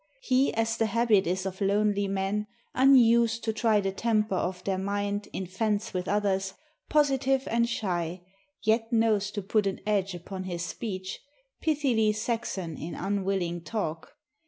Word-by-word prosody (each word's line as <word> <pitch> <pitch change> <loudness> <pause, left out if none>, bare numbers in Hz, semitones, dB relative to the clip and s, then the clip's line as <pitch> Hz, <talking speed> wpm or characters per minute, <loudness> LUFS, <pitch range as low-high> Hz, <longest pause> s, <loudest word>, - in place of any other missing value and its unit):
He, 260 +2 +3
as 225 0 0
the 225 - +2
habit 215 -4 +3
is 185 +2 -1
of 190 +1 -5
lonely 200 0 +2
men, 195 +2 -1 0.3
Unused 235 -3 +5
to 220 - 0
try 220 -1 +3
the 195 -1 -1
temper 215 0 0
of 180 0 -2
their 190 -1 -1
mind 205 +1 -2
In 190 - -4
fence 210 +4 -1
with 180 -1 -2
others, 195 -1 0 0.3
positive 270 -3 +2
and 235 +1 +2
shy, 175 -6 -2 0.4
Yet 225 +2 +1
knows 220 -3 +2
to 205 -1 -5
put 205 +1 +1
an 195 - -2
edge 195 -3 0
upon 185 +2 -7
his 175 -2 -3
speech, 190 -2 -5 0.4
Pithily 255 -9 +2
Saxon 215 -7 -3
in 170 - -6
unwilling 190 -3 -1
talk. 170 -7 -4
205 Hz, 155 wpm, -28 LUFS, 190-225 Hz, 0.4 s, Unused